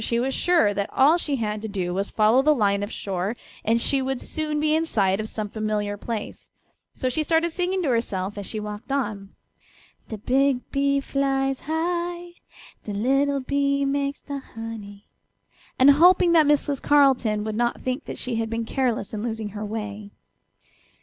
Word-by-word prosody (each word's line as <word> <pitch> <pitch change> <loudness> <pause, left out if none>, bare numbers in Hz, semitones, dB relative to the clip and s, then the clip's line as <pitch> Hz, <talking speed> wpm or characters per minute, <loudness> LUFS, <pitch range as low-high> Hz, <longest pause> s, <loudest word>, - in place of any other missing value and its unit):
She 235 +1 0
was 265 +2 0
sure 335 -13 +3
that 200 0 -2
all 300 +6 +4
she 295 -4 -1
had 215 -4 -2
to 220 - -4
do 185 -4 -3
was 195 +2 -1
to - - -16
follow 220 +4 +4
the 305 +2 +4
line 200 -4 +1
of 205 +2 -4
shore 195 +3 -3 0.3
and 230 +2 +2
she 270 +3 +1
would 265 -1 -2
soon 305 -1 -3
be 305 0 +2
in 320 - +2
sight 195 -10 +1
of 215 0 -3
some 215 -1 -3
familiar 210 -1 -2
place, 215 +1 -6 0.4
so 255 - -3
she 255 +5 0
started 325 +2 +1
singing 365 +2 -1
to 295 - 0
herself 205 -5 -1
as 205 -2 -6
she 215 - -4
walked 210 +4 -7
on: 210 -8 -3 0.7
"De 220 - -6
big 265 +4 +2
bee 280 0 +2
flies 270 -1 0
high, 345 +2 -2 0.5
De 210 - -5
little 275 +6 +1
bee 280 +1 0
makes 280 0 -1
de 280 -1 -5
honey," 220 -5 -9 0.7
and 265 +2 +7
hoping 350 +4 +5
that 320 -3 +5
Mrs. 290 -1 +1
Carleton 260 -7 +3
would 215 0 -3
not 240 +1 0
think 255 +3 -3
that - - -6
she 245 -3 -2
had 225 -1 -2
been 230 0 -2
careless 240 -5 -1
in 210 - -3
losing 220 -2 -3
her 210 +1 -6
way. 210 -1 -5
245 Hz, 185 wpm, -24 LUFS, 210-280 Hz, 0.7 s, and